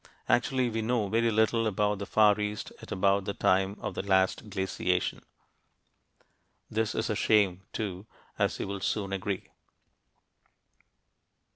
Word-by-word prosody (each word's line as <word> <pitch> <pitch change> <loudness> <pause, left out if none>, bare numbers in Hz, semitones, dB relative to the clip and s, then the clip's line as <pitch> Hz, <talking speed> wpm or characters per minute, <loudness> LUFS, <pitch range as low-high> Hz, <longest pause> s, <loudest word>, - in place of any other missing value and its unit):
Actually, 125 +1 +2
we 115 -1 -2
know 110 -2 0
very 115 +2 +2
little 110 +1 +2
about 105 0 0
the 100 - -5
Far 105 -1 +4
East 105 0 -3
at - - -11
about 100 +1 +2
the 100 - -3
time 95 +2 +2
of - - -4
the - - -3
last 95 +2 +1
glaciation. 95 -2 -1 1.5
This 110 0 0
is 110 - -1
a - - 0
shame, 100 -4 +3
too, 100 -1 -4 0.3
as - - +1
you - - -3
will 100 0 -4
soon 100 -2 -1
agree. 95 0 -3
105 Hz, 140 wpm, -29 LUFS, 95-110 Hz, 1.5 s, Far